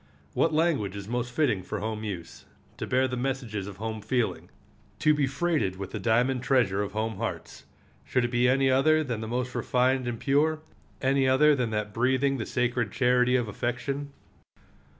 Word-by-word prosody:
What 160 - +2
language 155 - +1
is 100 -1 -7
most 120 +1 -2
fitting 120 -9 +1
for 90 - -5
home 110 0 -4
use, 95 -6 -7 0.3
to - - -4
bear 130 +1 +2
the 125 - -3
messages 125 -6 -3
of 100 -2 -9
home 110 0 -4
feeling, 120 +2 -1 0.5
to 155 - +4
be 145 -2 +1
freighted 140 - 0
with 95 0 -7
the - - -4
diamond 120 +3 +2
treasure 125 -7 +2
of 105 - -4
home 110 -1 -2
hearts? 115 +2 -5 0.4
Should 125 -2 0
it 120 - -3
be 125 0 +3
any 135 +1 +3
other 155 +4 +4
than 120 -6 -3
the 110 - -4
most 125 +2 -2
refined 125 +1 +1
and 120 -2 -3
pure? 155 +3 +1 0.4
any 135 0 +3
other 150 +3 +5
than 125 -5 0
that 105 -1 -3
breathing 130 +3 +1
the 110 - -3
sacred 120 -3 0
charity 125 0 +3
of 120 -3 +1
affection? 125 +6 -3
125 Hz, 185 wpm, -27 LUFS, 110-135 Hz, 0.5 s, other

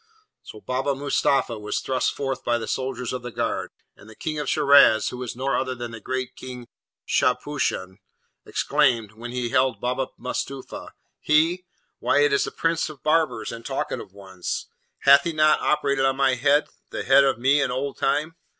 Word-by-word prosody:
So 110 - -11
Baba 130 +4 -1
Mustapha 135 -4 0
was 105 0 -2
thrust 130 -1 0
forth 135 -2 -3
by 120 0 +1
the 115 - -5
soldiers 130 -2 -3
of 125 - -4
the 125 - -6
guard; - - -2 0.3
and 105 - -16
the 110 - -13
King 155 +4 -4
of 145 - -3
Shiraz, 140 -6 +5
who 125 - -7
was 125 -2 -5
no 135 +2 -1
other 130 0 -1
than 120 -1 -6
the 115 - -8
great 130 +2 -4
King 125 -2 -9 0.4
Shahpushan, 95 +1 0 0.4
exclaimed, 115 -4 +1
when 115 +3 -9
he 125 0 -3
beheld 125 -1 +1
Baba 125 +3 -1
Mustapha, 130 +1 -6 0.2
'He? 165 +4 +2 0.3
why, 145 - +2
it 145 -1 +3
is 140 - +2
the - - -5
prince 165 -1 0
of 150 -3 -12
barbers 160 +1 +1
and 115 0 -8
talkative - - -4
ones! 95 -2 -5 0.4
Hath 140 +1 +7
he 170 - -2
not 155 0 +4
operated 140 -3 +1
on 135 0 +2
my 135 -1 +3
head, 145 +4 +2 0.2
the - - -4
head 135 +1 +6
of 135 - +2
me 135 +4 +3
in 135 - 0
old 135 +2 -3
time? 155 +4 0
130 Hz, 185 wpm, -24 LUFS, 120-140 Hz, 0.4 s, Hath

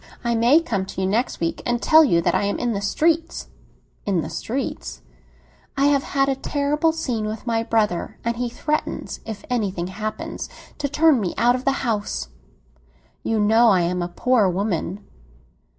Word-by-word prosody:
"I 235 -1 +1
may 235 +7 +5
come 200 -11 -2
to 190 - -5
you - - +1
next 220 +7 0
week 165 0 -2
and 240 0 0
tell 315 +5 +6
you 170 - +3
that - - +1
I - - +2
am 200 - -1
in 240 -1 -1
the 200 - -2
streets!" 325 +11 0 0.5
"In 190 -5 0
the 160 +2 -6
streets?" 160 - -4 0.7
"I 275 - +3
have 280 - +2
had 275 -1 0
a 275 - +2
terrible 290 +3 0
scene 245 -9 -2
with 215 +2 -6
my 230 -1 +1
brother, 220 -6 0
and 235 0 -1
he 245 0 -1
threatens, 300 +5 -3
if 220 -2 -6
anything 200 -8 -1
happens, 215 +3 -5 0.3
to 285 -1 -1
turn 300 -1 +4
me 180 -4 -2
out 240 +1 +4
of 255 +1 -4
the 270 -1 0
house. 210 - -2 0.9
You 225 -1 0
know 220 +3 +5
I 190 -4 +4
am 180 +1 0
a 175 - -1
poor 220 +3 +2
woman." 190 +1 -2
230 Hz, 180 wpm, -22 LUFS, 195-270 Hz, 0.9 s, tell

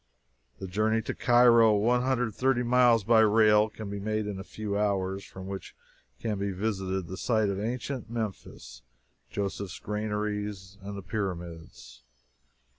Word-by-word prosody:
The - - -7
journey 110 +4 +1
to - - -3
Cairo, 120 -2 +5
one 120 +4 +2
hundred 130 -1 +1
and 110 -4 -4
thirty 130 -1 +1
miles 120 -2 +4
by 115 +2 +4
rail, 110 0 +5
can 110 0 -8
be 100 - -4
made 110 +1 -2
in 100 -2 -4
a - - -6
few 105 0 -5
hours, 100 -2 0
and - - -13
from 95 0 -10
which 95 0 -7 0.4
can 105 -3 -2
be 100 0 -1
visited 95 -2 -2
the 95 +2 -7
site 110 -2 +1
of 100 0 -2
ancient 120 +2 -4
Memphis, 110 - -6 0.5
Joseph's 100 -1 -4
Granaries, 105 -2 -4
and 100 +1 -7
the 100 - -7
Pyramids. 85 - -6
105 Hz, 160 wpm, -28 LUFS, 95-115 Hz, 0.5 s, Cairo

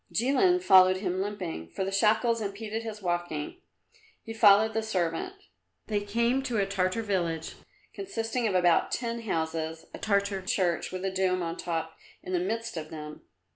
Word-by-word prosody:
Jilin 285 - +3
followed 185 - +7
him 185 -1 -2
limping, 185 - -5
for 190 - -3
the 195 - -3
shackles 220 +3 +2
impeded 215 +2 -4
his 215 -2 -7
walking. 175 - -3 0.6
He 225 - -7
followed 220 0 +6
the 225 - 0
servant. 185 - -2 0.5
They 210 -2 -1
came 235 +5 +1
to 245 -4 -2
a 200 - +2
Tartar 195 +3 -1
village, 170 -6 -2 0.4
consisting 240 - -2
of 195 - -1
about 175 -2 +3
ten 235 -1 -2
houses, 160 -5 -3
a - - -8
Tartar 200 -2 0
church 185 -5 0
with 185 +1 -4
a 190 - 0
dome 185 -1 +1
on 165 0 -3
top 160 -2 -4 0.2
in 185 - -5
the 180 - +2
midst 225 +2 -3
of 155 -1 -5
them. 150 -1 -8
195 Hz, 170 wpm, -28 LUFS, 175-225 Hz, 0.6 s, followed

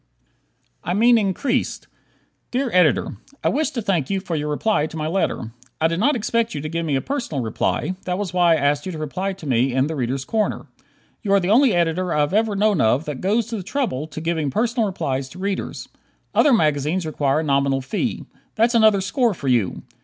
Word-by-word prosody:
"I 175 - -1
Mean 235 +2 +5
Increased" 240 +6 -1 0.6
Dear 255 -1 -1
Editor: 160 - +3 0.3
I - - +3
wish 305 +3 0
to 250 -7 -4
thank 170 -9 0
you 195 - 0
for 180 -3 -4
your 150 0 -2
reply 155 +1 +1
to 160 - -9
my 155 - -2
letter. 160 -9 -1 0.3
I 160 - +3
did 165 +1 -2
not 285 +8 +3
expect 230 -1 -1
you 145 - -3
to 155 - -4
give 165 0 -2
me 145 - +1
a 135 - 0
personal 240 - -3
reply: 115 - -1
that 180 0 -1
was 195 -3 -4
why 175 -2 +4
I - - +4
asked 145 +1 0
you - - -3
to - - -6
reply 180 +6 -3
to 185 -4 -12
me 130 -1 +1
in 130 0 +3
"The 160 +2 -3
Readers' 130 0 -2
Corner." 220 -2 -1 0.6
You 200 -2 0
are 200 - +6
the 185 +1 0
only 245 -2 +5
editor 175 +1 0
I 150 - +3
have 145 +4 0
ever 215 0 +2
known 205 -2 +2
of 125 +8 +2
that 150 -4 -5
goes 210 +4 +1
to 225 - -3
the - - -4
trouble 185 - -2
to 155 - -7
giving 160 -2 -1
personal 225 - 0
replies 135 -8 -3
to 175 - -13
readers. 195 +1 -4 0.5
Other 295 - +4
magazines 155 - +1
require 150 -1 0
a - - -3
nominal 140 -2 +1
fee. 210 - -3 0.3
That's 230 +2 +3
another 220 -4 +5
score 235 +2 +1
for 140 -5 -3
you! 115 -7 +1
175 Hz, 220 wpm, -22 LUFS, 145-215 Hz, 0.6 s, are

